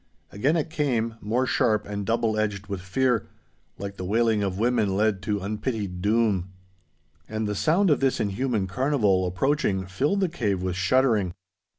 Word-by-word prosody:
Again 140 +11 +1
it 160 0 -2
came, 125 -8 0
more 120 +5 0
sharp 110 -4 +1
and 100 -1 -5
double 115 -1 +1
edged 105 -2 -1
with 100 -2 -5
fear, 120 +5 0 0.5
like 100 0 -6
the - - -5
wailing 110 +2 +2
of 95 -2 -2
women 110 -4 +1
led 105 -2 +1
to 100 0 -2
unpitied 105 -2 -3
doom. 100 -3 +1 0.8
And 110 0 -2
the 105 - -1
sound 165 - +2
of 145 - +3
this 135 -1 +1
inhuman 110 0 0
carnival, 105 -4 +1
approaching, 95 -1 0
filled 140 - 0
the 190 - +3
cave 105 - -1
with 90 -1 -2
shuddering. 100 -1 +2
110 Hz, 165 wpm, -25 LUFS, 100-125 Hz, 0.8 s, of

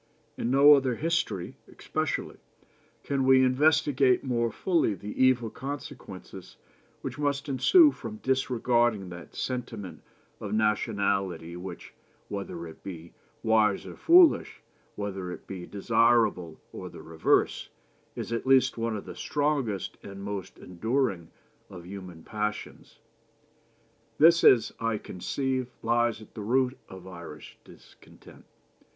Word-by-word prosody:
In 115 - -2
no 140 +3 +7
other 135 -4 +2
history 155 - -2
especially - - -3 0.7
can 140 -1 -1
we 130 0 +5
investigate 135 -1 +3
more 120 -3 0
fully 165 - +1
the 105 +6 -3
evil 125 -4 +3
consequences 135 - -8 0.4
which - - -6
must 145 0 -1
ensue 295 - +5
from 115 - -8
disregarding 120 -5 +1
that 90 -1 -11
sentiment 115 - -5 0.4
of 105 0 -4
nationality 100 -5 0
which, 90 0 -9 0.4
whether 100 -4 -5
it 80 - -12
be 85 -3 -9 0.3
wise 110 -3 +2
or - - -9
foolish, 340 -1 +4 0.3
whether 95 -3 -4
it - - -9
be 90 -2 -8
desirable 105 -5 +2
or - - -7
the - - -12
reverse, 80 -1 +1 0.5
is - - -5
at 115 +3 -3
least 130 -3 +4
one 115 -1 -1
of 100 - -8
the - - -8
strongest 140 -9 -2
and 100 0 -9
most 100 -2 -6
enduring 100 -1 -2 0.4
of 90 -2 -11
human 90 -3 -9
passions. 105 0 -5 1.2
This, 170 +2 +6
as 115 -4 +5
I 115 -1 0
conceive, 130 +7 -3 0.2
lies 120 -1 +1
at - - -19
the 110 - -7
root 125 +4 +1
of 95 -1 -11
Irish 85 -4 -11
discontent. - - -18
115 Hz, 125 wpm, -27 LUFS, 95-130 Hz, 1.2 s, no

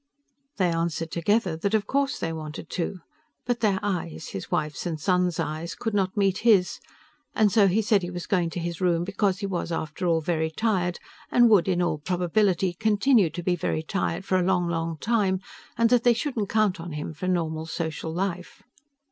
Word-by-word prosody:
They 180 -3 +2
answered 165 -1 -2
together 185 +1 +1
that 200 +6 0
of 215 -1 +1
course 280 +4 0
they 165 - -3
wanted 155 -1 -7
to. 180 0 -3 0.4
But 245 -1 0
their 205 -4 +2
eyes 175 - -3
his 95 - -6
wife's 150 +3 -2
and 160 -3 -3
son's 180 +1 +1
eyes 155 +3 -3
could 225 -2 -3
not 195 0 0
meet 195 -1 +2
his, 205 -6 +3 0.6
and 215 -2 +4
so 205 -2 +5
he 205 +4 +2
said 210 -1 +3
he 175 - -4
was 175 -1 -6
going 175 -4 +1
to 175 - -5
his 170 0 -4
room 170 -2 +2
because 195 +1 0
he - - -1
was, 180 -3 -3
after 165 +2 -3
all, 165 -1 +3
very 160 0 -1
tired 180 -1 0 0.3
and 240 -2 +5
would 195 -4 +5
in 180 -1 +1
all 155 -3 -1
probability 180 +2 +1
continue 215 +1 +3
to 175 +2 -6
be 180 0 +1
very 160 -2 -2
tired 175 +1 -2
for 185 - +2
a - - +1
long, 180 -1 +1
long 165 -1 -2
time 200 -2 +1 0.4
and 230 0 +3
that 245 -2 +4
they 240 - +6
shouldn't 235 -6 -2
count 215 -5 +2
on 165 -1 -7
him 150 +1 -5
for 160 +5 -5
normal 160 -3 -1
social 160 -1 -4
life. 180 0 -4
180 Hz, 200 wpm, -26 LUFS, 165-205 Hz, 0.6 s, they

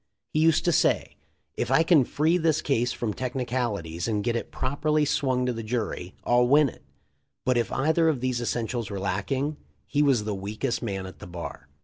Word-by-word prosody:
He 155 - +2
used 160 0 +4
to 175 - +4
say, - - +2 0.4
"If - - -2
I 165 - +5
can 165 -6 +5
free 160 +7 +2
this 160 -2 +1
case 125 -3 +1
from 115 -3 -2
technicalities 120 -10 -2
and 105 -2 0
get 120 +1 0
it 115 - -3
prop 130 +3 -3
erly 150 -1 +2
swung 130 -3 +1
to 125 - 0
the 115 - -5
jury, 110 -5 -3
I'll 120 0 +3
win 145 +2 +5
it." - - -15 0.6
But 130 - +3
if 120 -1 0
either 160 +4 +2
of 145 -5 0
these 125 -1 -1
essentials 120 -2 -2
were 100 -2 -4
lacking, 105 +10 -1 0.3
he 145 - 0
was 135 -7 +3
the 105 0 -2
weakest 105 +6 -3
man 95 -5 -3
at 95 - -10
the - - -9
bar. 85 -4 -7
125 Hz, 205 wpm, -26 LUFS, 105-145 Hz, 0.6 s, I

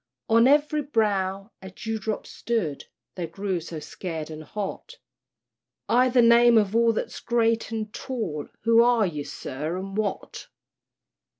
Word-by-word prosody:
On 230 +2 +5
every 295 +2 +3
brow 205 -6 -1
a 190 - -8
dewdrop 220 +1 -4
stood, 200 -12 -3 0.3
They 175 -3 -4
grew 190 +2 -3
so 165 -1 -7
scared 160 0 -6
and 155 0 -8
hot, 210 - -6 0.9
"I' 250 +2 +4
the 245 -1 +4
name 235 0 +6
of 210 -1 +2
all 230 0 +4
that's 220 - -4
great 230 -1 +1
and 220 -1 -4
tall, 215 - -4 0.2
Who 230 0 +5
are 235 -2 +4
ye, 150 -5 -3
sir, 155 +5 -5
and 195 +1 -6
what?" 215 -1 -3
215 Hz, 140 wpm, -25 LUFS, 185-235 Hz, 0.9 s, name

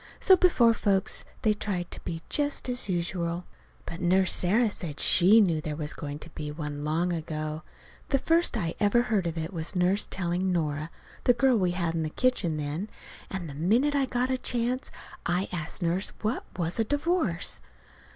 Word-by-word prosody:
So 380 - +6
before 265 -12 +4
folks 200 -2 0 0.2
they 215 -2 +4
tried 190 -4 -4
to - - -5
be 165 -1 -5
just 290 -2 -1
as 245 -4 0
usual. 175 -1 -2 0.4
But 170 - -7
Nurse 185 +2 +3
Sarah 215 +5 +2
said 160 -7 -6
she 195 +5 +6
knew 170 -7 +3
there 150 -1 -4
was 150 -1 -3
going 145 0 -6
to 155 - -11
be 150 -1 -6
one 150 -1 -5
long 165 +4 0
ago. 155 -1 -4 0.5
The 275 - +3
first 330 -1 +2
I 165 -6 -2
ever 220 +3 +3
heard 210 -7 0
of 165 0 -4
it 160 +3 -4
was 165 +3 -3
Nurse 180 +3 +2
telling 185 +1 -1
Nora, 155 -2 -1 0.4
the 245 - +6
girl 260 +1 +3
we 180 -2 +2
had 170 -2 -1
in 165 - -1
the 155 - -2
kitchen 185 -6 0
then; 150 +8 -3 0.4
and 190 -3 -5
the 145 - -7
minute 220 - +2
I 280 -1 +2
got 250 +1 0
a 260 - 0
chance 245 +2 -1 0.4
I 180 +3 0
asked 175 +1 -4
Nurse 175 +4 0
what 215 +4 -1
it - - -17
was 170 +5 -2
a - - +4
divorce. 290 - 0
180 Hz, 190 wpm, -28 LUFS, 165-230 Hz, 0.5 s, So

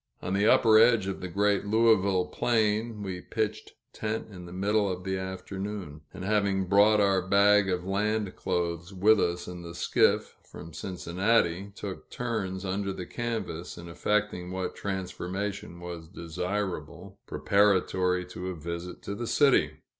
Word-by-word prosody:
On 95 - -3
the 100 +2 +3
upper 110 -1 +6
edge 115 -3 +5
of 95 -1 -4
the 90 - -4
great 100 +2 +1
Louisville 100 -4 +3
plain, 110 0 0
we 95 -2 -5
pitched 110 -2 -3 0.2
tent 110 +1 -3
in 90 -3 -10
the - - -10
middle 100 +2 +1
of 90 0 -5
the 95 0 -2
afternoon; 95 -3 -6
and, 95 -1 -7
having 100 -2 +1
brought 105 +3 +5
our 100 -2 +3
bag 100 +1 +4
of 90 -1 -1
land 105 +1 -1
clothes 85 +1 -2
with 105 +3 +5
us 85 -1 -1
in 90 -1 -7
the 85 0 -9
skiff, - - +2
from 80 - -11
Cincinnati, 95 +2 0
took 100 -2 -7
turns 100 -6 -3
under 100 +1 -2
the 90 -1 -6
canvas 110 -8 -4
in 85 - -9
effecting 90 0 -1
what 95 0 -3
transformation 95 -1 -4
was 85 -2 -7
desirable, 90 +1 -4
preparatory 95 -2 +2
to 90 0 -7
a 95 - -3
visit 85 +2 -7
in 100 - -3
the 120 - -3
city. 140 +1 +3
95 Hz, 155 wpm, -28 LUFS, 90-105 Hz, 0.2 s, upper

